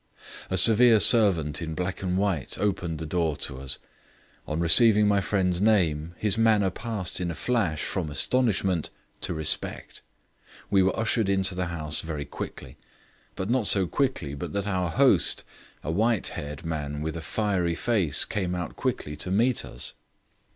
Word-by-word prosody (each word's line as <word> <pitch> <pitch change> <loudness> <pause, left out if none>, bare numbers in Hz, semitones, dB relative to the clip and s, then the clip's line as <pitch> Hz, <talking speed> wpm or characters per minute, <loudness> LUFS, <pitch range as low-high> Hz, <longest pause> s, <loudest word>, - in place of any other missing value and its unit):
A - - 0
severe 115 0 +6
servant 95 -9 +4
in 80 -1 -5
black 90 +2 -4
and 90 -1 -1
white 95 -8 -1
opened 90 -5 -2
the 80 - -6
door 80 -2 -1
to 65 -2 -5
us: 65 -1 -2 0.7
on 75 +1 -3
receiving 105 +5 +7
my 100 -1 +2
friend's 90 -2 0
name 85 -6 +1
his 105 +1 0
manner 105 -4 +3
passed 105 -4 -3
in 90 - -2
a 85 - -4
flash 100 -11 -1
from 90 -5 -3
astonishment 95 - 0 0.3
to 90 - -3
respect. 80 -1 -2 0.7
We 100 -1 +4
were 95 0 +1
ushered 110 -1 0
into 95 -1 0
the 90 0 -3
house 75 -3 -3
very 75 -3 -5
quickly, 70 - -9 0.6
but 95 - -4
not 120 -2 0
so 95 -2 +4
quickly 110 - -2
but 75 +2 -6
that 100 -1 -2
our 90 -3 -1
host, 80 - +3 0.4
a 75 - -3
white 110 +4 0
haired 75 +2 -7
man 75 -2 -4
with 80 +1 -4
a 85 - -5
fiery 90 -2 -1
face, 95 - +1
came 90 -3 -3
out 90 -1 -5
quickly 75 - -3
to 90 - -3
meet 115 +6 +1
us. - - -7
90 Hz, 165 wpm, -26 LUFS, 80-105 Hz, 0.7 s, receiving